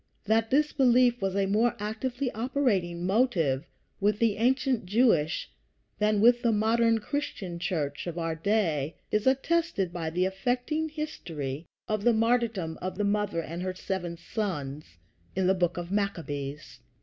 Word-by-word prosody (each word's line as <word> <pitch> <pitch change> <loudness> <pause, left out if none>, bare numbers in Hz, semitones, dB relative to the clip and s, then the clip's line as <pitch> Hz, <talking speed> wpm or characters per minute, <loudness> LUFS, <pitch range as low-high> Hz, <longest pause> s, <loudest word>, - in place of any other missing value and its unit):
That 225 +1 +2
this 300 +3 +2
belief 245 -2 +4
was 195 -1 -1
a 200 -1 +2
more 215 +4 +2
actively 240 +5 -3
operating 215 -8 0
motive 180 - +1 0.3
with 205 +1 +2
the 220 -2 +2
ancient 250 -2 +1
Jewish 190 -8 +2 0.5
than 210 -1 +2
with 240 +2 +6
the 235 - +3
modern 225 +2 +3
Christian 210 -8 -4
Church 155 -5 -2
of 175 0 -4
our 165 -1 -1
day 165 -4 0 0.2
is 215 +3 +1
attested 270 - +1
by 165 -2 -3
the 180 +3 +1
affecting 250 +11 -1
history 165 - -5 0.2
of 215 -1 -1
the 240 - +5
martyrdom 225 -7 +1
of 185 +1 -4
the 205 - 0
mother 205 -4 0
and 170 +3 -6
her 185 0 -3
seven 175 -2 -4
sons, 150 - -4 0.4
in 190 0 +1
the 190 - +4
Book 180 -2 0
of 175 +1 -5
Maccabees. 150 - -3
205 Hz, 150 wpm, -28 LUFS, 170-235 Hz, 0.5 s, with